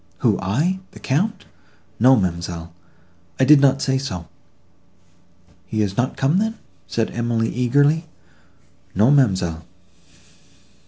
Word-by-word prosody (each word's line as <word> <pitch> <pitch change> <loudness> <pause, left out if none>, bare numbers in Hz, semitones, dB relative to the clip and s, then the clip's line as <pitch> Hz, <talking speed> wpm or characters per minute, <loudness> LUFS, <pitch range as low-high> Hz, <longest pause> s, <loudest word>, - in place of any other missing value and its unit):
"Who, - - +3
I!—the 170 - -2
Count! 190 +9 -1 0.5
No, 130 +4 +6
ma'amselle, 85 -4 -3 0.7
I 130 - +4
did 145 0 +7
not 135 -1 +3
say 135 0 +1
so." 90 - -6 1.4
"He 110 -1 -1
is 100 -2 -3
not 125 +4 -1
come 145 +7 +2
then?" 220 +1 -1 0.3
said 115 -1 -2
Emily 115 -1 -1
eagerly. 145 +6 +2 0.9
"No, 110 +8 +4
ma'amselle." 95 - +1
125 Hz, 110 wpm, -21 LUFS, 95-145 Hz, 1.4 s, did